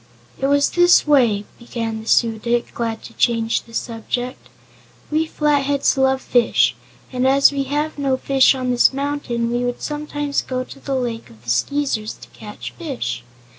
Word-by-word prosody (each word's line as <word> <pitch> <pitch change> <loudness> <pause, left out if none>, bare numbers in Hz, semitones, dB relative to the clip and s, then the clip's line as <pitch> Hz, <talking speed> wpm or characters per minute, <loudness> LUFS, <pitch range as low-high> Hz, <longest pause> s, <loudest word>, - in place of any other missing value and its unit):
"It 270 - +1
was 285 0 +3
this 350 0 +5
way," 240 -9 +3
began 230 -2 -4
the 220 - -13
Su 225 -2 +3
dic, 235 +1 -1
glad 230 -2 -3
to 230 - -11
change 230 -1 +1
the 230 - -18
subject. 245 +3 -4 0.6
"We 315 +1 +1
Flatheads 285 -2 +1
love 265 0 +2
fish, 245 -2 +3 0.4
and 255 +1 +1
as 275 +1 +5
we 275 -1 -2
have 295 +2 -2
no 270 -2 +1
fish 270 0 +4
on 255 -1 -2
this 245 +2 +4
mountain 270 -4 -2
we 240 +1 0
would 245 0 -3
sometimes 295 -1 -2
go 255 -1 -3
to 275 - -12
the 275 0 -3
Lake 235 - -3
of 110 -1 -18
the 120 - -2
Skeezers 225 - -1
to - - -15
catch 210 -1 -9
fish. 120 - -5
255 Hz, 170 wpm, -20 LUFS, 230-280 Hz, 0.6 s, this